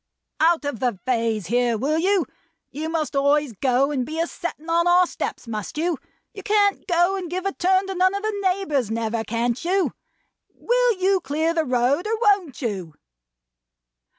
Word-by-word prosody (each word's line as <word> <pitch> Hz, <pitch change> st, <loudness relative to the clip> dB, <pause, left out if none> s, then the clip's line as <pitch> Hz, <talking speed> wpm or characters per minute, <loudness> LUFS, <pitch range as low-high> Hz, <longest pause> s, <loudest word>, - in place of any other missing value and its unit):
"Out 325 Hz, -1 st, +3 dB
of 285 Hz, -6 st, -3 dB
the 240 Hz, -7 st, -1 dB
vays 230 Hz, -5 st, 0 dB
here, 240 Hz, +3 st, +1 dB
will 295 Hz, +7 st, 0 dB
you! 380 Hz, +1 st, +2 dB, 0.5 s
You 310 Hz, +3 st, -4 dB
must 320 Hz, -3 st, -2 dB
always 285 Hz, -1 st, +2 dB
go 260 Hz, +5 st, +1 dB
and 265 Hz, -4 st, -1 dB
be 315 Hz, +5 st, -5 dB
a 335 Hz, -, +2 dB
settin 340 Hz, -2 st, -6 dB
on 340 Hz, +1 st, +2 dB
our 355 Hz, +1 st, +5 dB
steps, 300 Hz, -, -5 dB
must 215 Hz, +3 st, -5 dB
you! 330 Hz, -1 st, 0 dB, 0.3 s
You 400 Hz, -, -8 dB
can't 405 Hz, 0 st, +1 dB
go 350 Hz, +1 st, +2 dB
and 360 Hz, -3 st, -5 dB
give 365 Hz, +2 st, -4 dB
a 390 Hz, -, 0 dB
turn 375 Hz, +2 st, +2 dB
to 385 Hz, -, -4 dB
none 370 Hz, +1 st, +2 dB
of 400 Hz, -, -4 dB
the 435 Hz, -1 st, -1 dB
neighbors 365 Hz, -, 0 dB
never, 225 Hz, 0 st, -2 dB
can't 235 Hz, +4 st, -1 dB
you? 375 Hz, +2 st, +1 dB, 0.6 s
Will -, -, +1 dB
you 380 Hz, +1 st, +2 dB
clear 315 Hz, +4 st, 0 dB
the 325 Hz, -2 st, 0 dB
road, 255 Hz, -, +1 dB
or 445 Hz, +1 st, 0 dB
won't 395 Hz, -, +1 dB
you?" 190 Hz, -9 st, -4 dB
320 Hz, 180 wpm, -23 LUFS, 250-375 Hz, 0.6 s, our